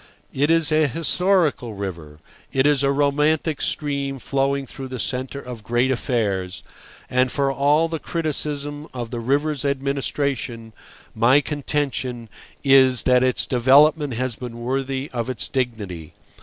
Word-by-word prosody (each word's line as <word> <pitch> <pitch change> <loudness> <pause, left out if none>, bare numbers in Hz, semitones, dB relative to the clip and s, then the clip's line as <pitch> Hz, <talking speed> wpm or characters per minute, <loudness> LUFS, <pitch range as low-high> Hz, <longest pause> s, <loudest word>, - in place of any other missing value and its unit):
It 145 +3 +1
is 165 -2 +3
an 155 -1 +3
historical 165 - +1
river; 85 -7 -6 0.3
it 135 0 +2
is 145 -1 +3
a 140 0 +2
romantic 150 +2 +1
stream 140 -2 -2
flowing 135 +2 -1
through 135 +1 -8
the 130 0 -6
centre 130 +3 -3
of 125 -5 -9
great 120 +3 +1
affairs, 100 -7 -2 0.4
and 130 0 +1
for 140 -1 0
all 145 +4 +2
the 165 -1 -4
criticism 150 -2 -3
of 120 -2 -5
the 120 - -3
river's 145 +4 0
administration, 140 -4 -2 0.4
my 120 +6 +4
contention 135 -5 -3 0.3
is 130 -4 +5
that 125 -1 +4
its 130 -1 +2
development 140 +2 +4
has 130 0 -2
been 120 -1 -8
worthy 135 +2 -2
of 120 0 -3
its 125 -4 -2
dignity. 105 - -4
135 Hz, 140 wpm, -22 LUFS, 120-145 Hz, 0.4 s, is